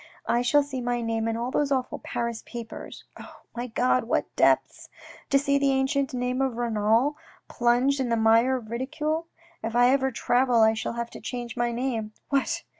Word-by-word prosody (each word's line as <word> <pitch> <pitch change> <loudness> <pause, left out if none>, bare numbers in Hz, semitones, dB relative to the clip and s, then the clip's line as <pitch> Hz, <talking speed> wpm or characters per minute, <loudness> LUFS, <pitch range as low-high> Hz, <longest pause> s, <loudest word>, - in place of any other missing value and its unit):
I 240 - +1
shall 290 +4 +3
see 270 -2 -5
my 240 0 -1
name 225 0 -1
in 225 0 -1
all 240 +2 -3
those 285 0 0
awful 260 -2 -1
Paris 235 -1 -3
papers. 235 -2 -8 0.2
Oh, - - -12
my 240 +1 -3
God, 245 +1 +1
what 230 - -1
depths. - - +2 0.4
To 275 - +4
see 280 0 +2
the 280 0 +2
ancient 270 0 +1
name 250 0 -1
of 260 -3 -1
Renal 230 +4 +1 0.3
plunged 245 +4 +2
in 260 -2 -1
the 230 - +1
mire 225 +4 +4
of 230 -4 -7
ridicule. 305 +6 -2 0.3
If 225 +1 -4
I 245 +1 +5
ever 265 0 +2
travel 245 0 +2
I 220 0 +5
shall 220 - -3
have 235 0 -4
to - - -10
change 240 -2 -5
my 240 -1 0
name. 235 -3 -3 0.2
What 275 -1 0
245 Hz, 190 wpm, -26 LUFS, 235-265 Hz, 0.4 s, I